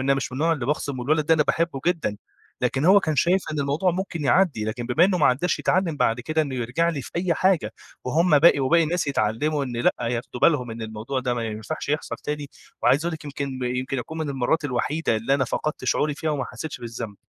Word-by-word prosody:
أنا 135 +1 +2
مش 135 -1 -3
من - - -5
النوع 165 +3 +2
اللي 135 -7 -3
باخصِم 145 -2 -2
والولد 150 +4 +1
ده 160 - +5
أنا 155 - +3
باحبه 160 -2 -1
جدًا. 165 -12 0 0.4
لكن 130 +3 0
هو 195 +3 +7
كان 155 -5 -1
شايف 175 +7 +3
إن 150 - -1
الموضوع 145 +6 +1
ممكن 175 -3 -4
يعدّي، 140 - +3
لكن 115 +2 -4
بما 145 +8 +4
إنه 185 -1 +2
ما 150 - +4
عدّاش 150 +8 +1
يتعلّم 175 -4 +1
بعد 115 -1 +1
كده 155 +5 0
إنه 140 -3 -4
يرجع 125 +7 0
لي 150 -5 -2
في - - -10
أي 175 -1 +1
حاجة، 170 - +1 0.3
وهُم 155 +4 +3
باقي 150 -1 +6
وباقي 165 +6 +4
الناس 170 0 -1
يتعلّموا 140 +4 0
إن 125 -3 -5
لأ، 120 - +3
ياخدوا 120 +1 -3
بالهم 130 -7 +3
إن 115 0 -6
الموضوع 110 +4 -4
ده 125 -1 -1
ما 115 - -2
ينفعش 110 +9 -5
يحصل 150 +2 -2
تاني 150 -1 -5 0.3
وعايز 145 +5 +3
أقول 170 - -1
لك 155 - -10
يمكن 140 -2 -5
يمكن 125 +2 -2
أكون 160 +6 -6
من 155 - -2
المرّات 135 +4 0
الوحيدة 145 0 0
اللي 115 +5 +1
أنا 135 - +1
فقدت 150 +4 -3
شعوري 150 -1 +1
فيها 155 +2 -2
وما 140 -4 -1
حسّيتش 160 -3 -7
بالذنب. 115 -3 -6
145 Hz, 230 wpm, -24 LUFS, 125-160 Hz, 0.4 s, هو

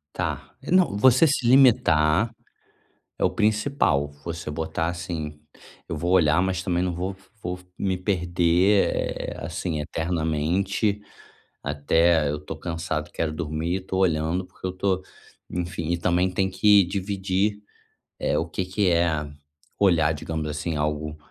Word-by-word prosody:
Tá, - - -4
é - - -6
não, 180 - +3
você 130 +7 +6
se 135 -4 +1
limitar, 110 - +5 0.9
é - - 0
o - - +4
principal. 105 - +1
Você 85 -2 -5
botar 80 +1 -2
assim: 85 -4 -5 0.5
"Eu - - -3
vou 85 +4 -1
olhar 85 -2 +4
mas 95 -1 -1
também 90 -2 0
não 90 -1 -1
vou 95 +3 -4 0.3
vou 90 +1 -4 0.2
me 95 -1 0
perder, 90 +1 +2
eh, - - -3
assim, 80 -4 -3
eternamente, 85 +6 -1 0.6
até 75 +2 +2
eu 75 - -3
tô 75 +1 -7
cansado 80 -2 -3
e - - -28
quero 80 -2 -2
dormir, 80 +3 -2
tô 95 0 -4
olhando 85 0 +1
porque 95 - -9
eu 90 - -2
tô" 95 0 -1 0.5
enfim, 85 -1 -3
e 85 - 0
também 90 +2 +1
tem 95 +1 0
que 105 +1 +5
dividir, 100 +2 -1 0.6
eh, - - 0
o 80 - -1
que 90 +3 -3
que 95 +1 +1
é 85 -3 +1 0.5
olhar, 85 -6 +4
digamos 80 +1 -4
assim, 75 +2 -3
algo 75 0 -2
85 Hz, 145 wpm, -25 LUFS, 80-95 Hz, 0.9 s, você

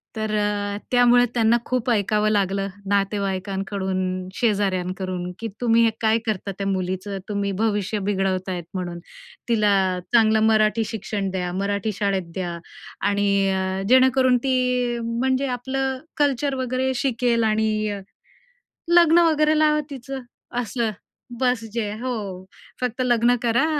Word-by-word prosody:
तर 215 -1 -2
अ, 205 -1 -1
त्यामुळे 245 0 +5
त्यांना 230 0 +3
खूप 255 -1 -1
ऐकावं 210 0 +2
लागलं 195 -1 0 0.2
नातेवाईकांकडून, 195 -1 -1 0.4
शेजाऱ्यांकडून, 185 -4 -1
"की 230 - -3
तुम्ही 230 -1 +4
हे - - +4
काय 220 0 +3
करता 210 -3 -2
त्या 195 - -2
मुलीचं? 190 +1 -2
तुम्ही 200 -1 -1
भविष्य 210 -1 0
बिघडवतायत 190 -2 -1
म्हणून. 175 -2 -4 0.5
तिला 215 -3 +3 0.4
चांगलं 220 -2 +5
मराठी 215 0 +3
शिक्षण 205 -2 -3
द्या, 180 -1 -2
मराठी 200 +2 -1
शाळेत 195 -4 -1
द्या 175 -2 -3 0.5
आणि 205 0 +1 0.2
अ, 190 0 -1
जेणेकरून 260 0 +5
ती 250 -2 +1
म्हणजे 260 +4 0
आपलं 265 +1 -2 0.2
कल्चर 285 -1 +1
वगैरे 260 0 -1
शिकेल 240 -2 +1
आणि 215 -1 +1 1.1
लग्न 340 -1 +6
वगैरे 305 0 +3
लावा 305 -1 +3
तिचं." 270 0 -6 0.4
असं. 230 0 -2 0.5
बस 250 -3 +1
जे 220 -3 -2
हो, 250 -1 -2 0.6
फक्त 250 0 -2
लग्न 240 0 +3
करा, 240 +4 +2
220 Hz, 125 wpm, -23 LUFS, 195-245 Hz, 1.1 s, लग्न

